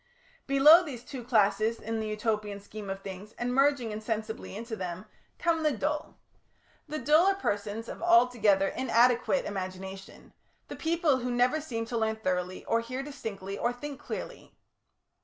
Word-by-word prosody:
Below 290 +5 +8
these 260 -7 -7
two 260 -4 -7
classes 220 -1 +2
in 225 0 -3
the 220 - -3
Utopian 210 -1 -2
scheme 205 0 -9
of 195 0 -4
things, 195 +2 -8
and 245 +1 -2
merging 275 -4 +2
insensibly 220 0 -4
into 230 +1 -5
them, 185 -1 -5 0.3
come 335 -2 +1
the 305 -2 +2
Dull. 295 +6 -3 0.7
The 305 - -4
Dull 305 +7 +4
are 390 - +4
persons 210 - -3
of - - -8
altogether 245 - +4
inadequate 245 +1 +2
imagination, 190 0 -7 0.4
the - - -6
people 325 -4 +1
who 250 0 -3
never 245 +5 +2
seem 230 -7 -4
to 235 +1 -3
learn 220 0 0
thoroughly, 185 -3 -2
or 230 - +2
hear 255 +3 -5
distinctly, 205 -9 -6
or 240 - +1
think 280 +3 -7
clearly. - - -7
230 Hz, 160 wpm, -29 LUFS, 205-275 Hz, 0.7 s, Below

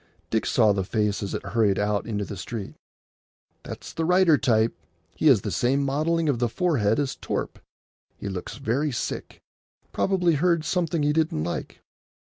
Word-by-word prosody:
Dick 110 - 0
saw 110 -4 +4
the 95 -1 -1
face 105 +1 -1
as 100 - -3
it - - -5
hurried 100 -1 +2
out 105 0 0
into 105 -3 -2
the 100 - -7
street. 100 +2 -6 0.9
"That's - - -8
the 165 - -2
writer 180 -1 +5
type. 115 -5 +2 0.4
He 155 - +1
has 125 -9 +6
the 105 - -4
same 125 - +1
modelling 155 +4 0
of 135 -5 +1
the 120 -1 +1
forehead 115 - +1
as 140 -2 -1
Torp. - - -4 0.6
He - - -6
looks 95 +3 -5
very 140 +3 0
sick. 120 - -5 0.5
Probably 180 -3 +2
heard 170 +1 +2
something 170 -3 0
he 145 0 +2
didn't 155 - 0
like." 85 - -5
125 Hz, 170 wpm, -25 LUFS, 105-155 Hz, 0.9 s, has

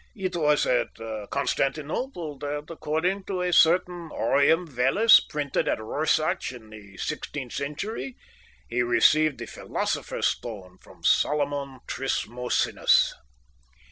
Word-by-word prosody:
It 185 -3 -3
was 150 -3 +2
at 125 - 0 0.3
Constantinople 150 - -2
that, 145 +2 -5
according 165 +5 -1
to 185 -2 -2
a 180 0 0
certain 175 0 +3
aureum 160 +5 +2
vellus 150 - +5
printed 145 -2 -2
at - - 0
Rorschach 155 +8 0
in 110 -3 -13
the 100 -2 -13
sixteenth 145 -4 -5
century, 140 - -4 0.5
he 120 +1 0
received 155 +4 +3
the - - -6
philosopher's - - -3
stone 95 -6 -4
from - - -18
Solomon 140 -3 +1
Trismosinus. 125 -2 +1
145 Hz, 110 wpm, -26 LUFS, 130-165 Hz, 0.5 s, vellus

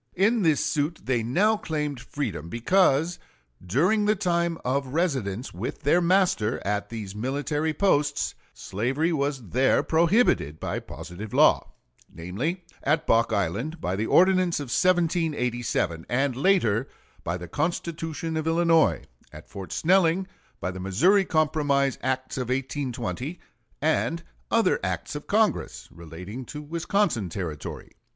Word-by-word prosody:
In 215 +5 +3
this 160 -5 +2
suit 150 +3 -1
they 125 -2 0
now 195 - +2
claimed 150 - -3
freedom, 110 - -5
because 165 - +2 0.4
during 175 - +2
the 210 +1 +3
time 170 -4 0
of 135 +2 0
residence 130 - -1
with 105 - -5
their 160 +5 +4
master 175 - +2
at 105 0 -1
these 105 -4 -6
military 145 +7 -1
posts 150 -5 +1 0.2
slavery 135 - -1
was 140 - -2
there 130 +6 +3
prohibited 165 - +2
by - - -3
positive 100 +5 -8
law; - - +4 0.4
namely, 120 - -4 0.2
at 150 +3 +1
Bock 115 0 +3
Island 110 - -1
by 90 - -2
the 110 +3 -1
ordinance 185 -2 +4
of 135 -4 -4
1787, 145 - 0
and 130 +1 +1
later 135 - +2 0.4
by 85 +2 -2
the 90 0 -8
Constitution 165 - -3
of 155 0 -2
Illinois; 165 -1 +3 0.3
at - - -12
Fort 95 -2 -8
Snelling 180 +1 +3 0.3
by 90 - -2
the 95 - -8
Missouri 170 - +3
Compromise 145 -4 +1
acts 130 +1 -2
of 125 -1 -3
1820, 130 +3 -3 0.4
and 160 +1 +1 0.3
other - - +3
acts - - -3
of - - -7
Congress - - 0
relating 90 +9 -8
to 150 - -7
Wisconsin 160 - -1
Territory. 80 -4 -6
145 Hz, 130 wpm, -26 LUFS, 115-170 Hz, 0.4 s, their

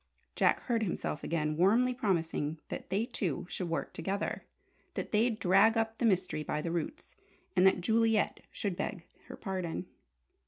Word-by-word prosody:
Jack - - +3
heard 235 -3 0
himself 175 -6 -2
again, 155 -2 0
warmly 225 +9 +4
promising 165 - 0
that - - -6
they 200 +4 +1
two 180 - -2
should 180 -1 -4
work 165 - -2
together, 195 +4 -2 0.5
that - - -3
they'd 225 +1 +2
drag 195 +5 +5
up 225 0 -1
the - - +2
mystery 185 -6 +1
by 150 0 -2
the 165 +2 -2
roots, 175 - -4 0.4
and 185 +1 +6
that 190 - +3
Juliet 225 +2 +2
should 200 -4 -2
beg 170 - -3 0.2
her - - -7
pardon. 185 -2 -3
190 Hz, 160 wpm, -32 LUFS, 170-225 Hz, 0.5 s, and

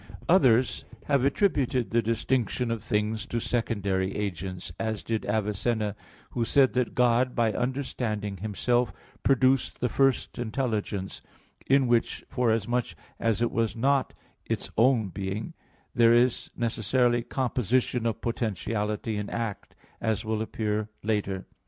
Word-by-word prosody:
Others 130 -8 +4 0.2
have 140 -3 +2
attributed 140 - +1
the 115 - +3
distinction 115 +1 0
of 115 -2 -2
things 105 +1 -1
to 120 - -2
secondary 100 -5 -1
agents, 95 -3 -4
as 110 -2 -2
did 110 -1 -2
Avicenna, 105 0 0 0.4
who 120 - -1
said 135 +3 +4
that 125 -2 0
God 125 +1 +3
by 115 -2 +2
understanding 115 -5 -2
Himself, 115 +5 0 0.3
produced 130 -1 +2
the 125 - 0
first 135 0 +1
intelligence; 110 -5 -2 0.5
in 135 0 +4
which, 120 -1 +1
forasmuch 120 -4 0 0.2
as 115 0 +1
it 120 - +1
was 115 0 0
not 135 +3 +1 0.3
its - - -3
own 115 -3 +3
being, 100 - -4 0.4
there 115 -2 +5
is 120 0 +2
necessarily 120 +1 +1
composition 125 -1 0
of 115 - -2
potentiality 105 -1 -2
and 105 0 -3
act, 115 -4 -4 0.3
as 110 +1 -1
will 110 0 -1
appear 110 -1 -2
later 100 -3 -1
(Q. - - -19
115 Hz, 130 wpm, -27 LUFS, 105-125 Hz, 0.5 s, there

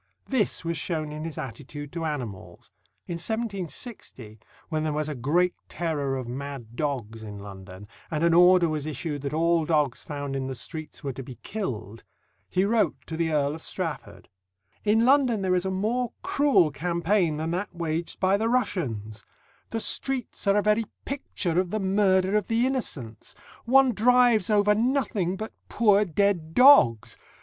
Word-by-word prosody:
This 220 -9 0
was 165 -1 -1
shown 155 -3 -2
in 155 +1 -6
his 165 -3 -6
attitude 145 +3 -7
to 165 -1 -4
animals. 125 -11 -6 0.3
In 170 - -4
1760, 195 - -5 0.3
when 155 -2 -1
there 155 -1 -1
was 150 0 -1
a 150 - -3
great 160 +8 +1 0.2
terror 145 -6 -2
of 130 -2 -5
mad 130 -2 -7
dogs 120 -7 -3
in 105 -2 -8
London, 95 -1 -10 0.2
and 155 0 -2
an 170 0 +4
order 180 0 +6
was 155 -2 -3
issued 150 0 -4
that 140 0 -3
all 165 0 +2
dogs 150 -5 +1
found 145 -2 -5
in 135 -1 -2
the 130 - -4
streets 155 +5 -7
were 135 -2 -3
to 135 - -7
be 130 -1 -9
killed, 115 - -5 0.5
he 185 +1 +1
wrote 220 +1 +2
to 160 - -6
the 165 0 0
Earl 145 -1 +1
of 160 - -8
Strafford: 165 -6 -5 0.6
In 220 +2 +3
London 255 -6 +3
there 185 -1 +1
is 180 0 +1
a - - 0
more 220 +6 -1
cruel 275 - +3
campaign 170 +2 0
than 160 +2 -2
that 185 +4 -2
waged 165 0 -3
by 190 +1 +3
the 225 +2 0
Russians: 120 - -2 0.5
the 225 - -2
streets 255 -1 -1
are 200 +1 +4
a 205 - +2
very 210 +2 +2 0.2
picture 185 - -2
of 185 -1 0
the 215 - -2
murder 190 0 +2
of 210 -3 +1
the 230 +2 +2
innocents 140 - -4 0.3
one 260 +1 +5
drives 240 -2 +4
over 210 -1 +4
nothing 220 -6 0
but 215 +3 -6 0.2
poor 210 -2 +4
dead 175 -2 0
dogs! 245 - +6
170 Hz, 170 wpm, -26 LUFS, 145-210 Hz, 0.6 s, order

